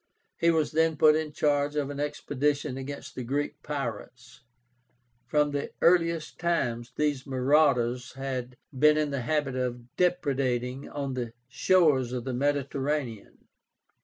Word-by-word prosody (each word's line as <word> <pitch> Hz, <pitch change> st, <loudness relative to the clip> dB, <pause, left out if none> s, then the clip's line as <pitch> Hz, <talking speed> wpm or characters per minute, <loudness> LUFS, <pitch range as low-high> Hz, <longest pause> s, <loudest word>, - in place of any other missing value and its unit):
He 170 Hz, -, +4 dB
was 160 Hz, -2 st, +2 dB
then 160 Hz, 0 st, +2 dB
put 155 Hz, 0 st, +6 dB
in 155 Hz, -1 st, -2 dB
charge 145 Hz, 0 st, +1 dB
of 145 Hz, -1 st, -1 dB
an 140 Hz, -, -6 dB
expedition 145 Hz, -1 st, -1 dB
against 135 Hz, +2 st, -7 dB
the 130 Hz, -, -5 dB
Greek 140 Hz, +4 st, -2 dB
pirates. 125 Hz, -3 st, -6 dB, 0.9 s
From 150 Hz, -1 st, +2 dB
the 145 Hz, 0 st, -3 dB
earliest 170 Hz, -2 st, +2 dB
times 120 Hz, -8 st, -1 dB
these 145 Hz, -3 st, -1 dB
marauders 130 Hz, -2 st, +2 dB
had 130 Hz, -2 st, -5 dB, 0.2 s
been 150 Hz, +3 st, +5 dB
in 150 Hz, -1 st, 0 dB
the 140 Hz, -2 st, -2 dB
habit 135 Hz, +1 st, -1 dB
of 125 Hz, -1 st, -4 dB
depredating 135 Hz, -7 st, 0 dB
on 140 Hz, -2 st, -3 dB
the 120 Hz, -3 st, -4 dB
shores 135 Hz, -4 st, +3 dB
of 125 Hz, -2 st, -3 dB
the 130 Hz, -, -3 dB
Mediterranean. 140 Hz, -3 st, -2 dB
140 Hz, 135 wpm, -28 LUFS, 125-150 Hz, 0.9 s, put